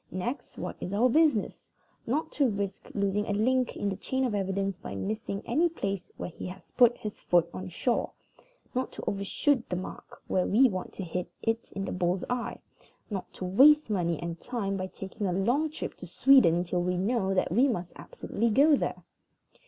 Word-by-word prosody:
Next, 235 +10 -4
what - - -5
is 185 - -4
our 235 +5 +4
business? 300 -5 +3 0.5
Not 305 +7 -1
to 280 -4 +2
risk 200 -2 -4
losing 200 +1 0
a 205 - 0
link 250 +4 +1
in 205 - -1
the 195 - -1
chain 260 +7 -1
of 240 - -1
evidence 195 -1 -1
by - - -7
missing 210 -1 -3
any 315 +9 +2
place 195 - -4
where - - -5
he - - -7
has 180 0 -11
put 245 -1 +5
his 210 -1 -6
foot 175 -1 +3
on 185 0 -6
shore. 235 +7 0 0.6
Not 255 +1 -1
to - - -7
overshoot 230 +6 0
the 180 - -1
mark 180 - -8
when 185 - 0
we 255 +6 +6
want 185 -3 -4
to 195 - -5
hit 180 +1 -4
it 225 0 -1
in 195 0 -3
the - - -4
bull's 180 0 0
eye. 245 -1 -2 0.5
Not 195 -3 -4
to 185 - -6
waste 275 +8 +6
money 170 -5 0
and 170 -1 -5
time 210 -6 -3
by 190 -1 -3
taking 195 +2 -5
a 180 - 0
long 245 - +1
trip 305 - -5
to 180 - -9
Sweden 175 -5 +5
till 180 0 -1
we 180 0 0
know 195 0 +1
that 185 - +1
we 245 +9 +4
must 180 -9 -3
absolutely 230 +2 -2
go 285 +7 +6
there. - - -3
200 Hz, 200 wpm, -29 LUFS, 185-245 Hz, 0.6 s, we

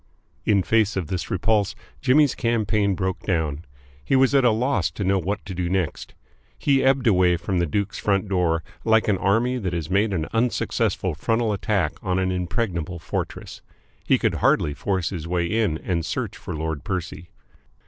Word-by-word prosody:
In 100 -3 +3
face 110 0 +2
of 90 -6 -3
this 90 -2 -3
repulse, 100 +1 +1 0.3
Jimmy's 140 +1 +4
campaign 105 -4 +1
broke 95 0 -2
down. 80 -4 -2 0.4
He 135 - +1
was 135 +1 +4
at 135 -1 +5
a 120 - +6
loss 125 +5 +1
to 100 - -5
know 95 +1 +2
what 100 +4 -3
to 95 - -6
do 90 -1 -2
next. 90 -4 -2 0.4
He 140 -2 +2
ebbed 135 -1 +3
away 90 -5 +4
from 90 +2 -2
the 85 - +1
Duke's 100 +6 -2
front 100 0 +1
door 85 -4 +1 0.2
like 110 0 +3
an 100 -3 +2
army 115 +7 +1
that 95 -5 -3
has 85 0 -3
made 100 +3 +2
an 80 -5 -1
unsuccessful 115 +1 0
frontal 115 -1 0
attack 100 -5 0
on 95 -3 -1
an 95 0 +1
impregnable 90 -1 -2
fortress. 80 -1 -5 0.4
He - - +3
could - - 0
hardly 75 - +3
force 95 +1 -1
his 85 -4 -5
way 85 0 0
in 105 -4 0
and 85 0 -2
search - - -3
for 90 - -7
Lord 80 -3 -3
Percy. 90 -2 -5
95 Hz, 180 wpm, -23 LUFS, 85-110 Hz, 0.4 s, a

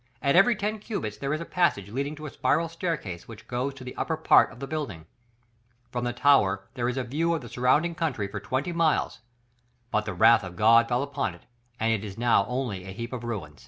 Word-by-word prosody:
At 140 +4 +2
every 205 +6 +6
ten 210 +2 -2
cubits 200 - -4
there 140 0 -3
is 155 +2 -1
a - - -5
passage 105 - 0
leading 140 +5 -2
to 155 0 -9
a 145 - -6
spiral 165 +1 +1
staircase, 160 - -4
which 110 -1 -12
goes 130 +2 -2
to 135 - -10
the 125 - -8
upper - - -2
part - - +5
of - - -13
the 135 - -4
building; 135 - -5 0.9
from 120 0 -2
the 120 - 0
tower 115 -7 +3
there 120 -1 -1
is 125 - -3
a 130 - 0
view 160 +7 0
of 160 - -4
the 120 - -10
surrounding 145 +7 +2
country 150 -12 -2
for 100 +1 -6
twenty 135 - -2
miles; 165 -2 +1 0.7
but 110 0 +1
the 100 -3 -4
wrath 115 +4 +6
of 90 -2 -8
God 115 +4 +5
fell 125 +2 0
upon 135 -9 -3
it 85 - -19 0.4
and 115 0 +2
it 110 -2 -2
is 100 -2 -7
now 115 -4 +3
only 125 -7 -3
a 95 - -7
heap 115 +4 -6
of 120 -2 -5
ruins." 95 -11 -5
125 Hz, 235 wpm, -27 LUFS, 110-150 Hz, 0.9 s, every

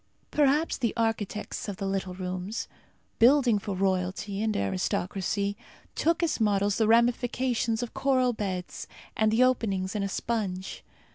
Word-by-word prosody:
Perhaps 295 +2 +2
the 235 -4 0
architects 225 -2 -2
of 195 - -5
"the 195 - -4
little 190 -1 -2
rooms," 185 +3 -4 0.5
building 245 -3 +5
for 200 -1 -4
royalty 190 +1 -1
and 220 -1 0
aristocracy, 185 - -1 0.4
took 335 +2 +1
as 330 - 0
models 205 -1 +2
the 220 - +3
ramifications 235 0 +2
of 240 - -6
coral 255 -2 +2
beds, 185 -4 -4 0.3
and 220 0 +3
the 230 +3 +4
openings 200 -7 +1
in 210 - -2
a 195 - -1
sponge. 195 -4 -3
210 Hz, 140 wpm, -28 LUFS, 190-240 Hz, 0.5 s, building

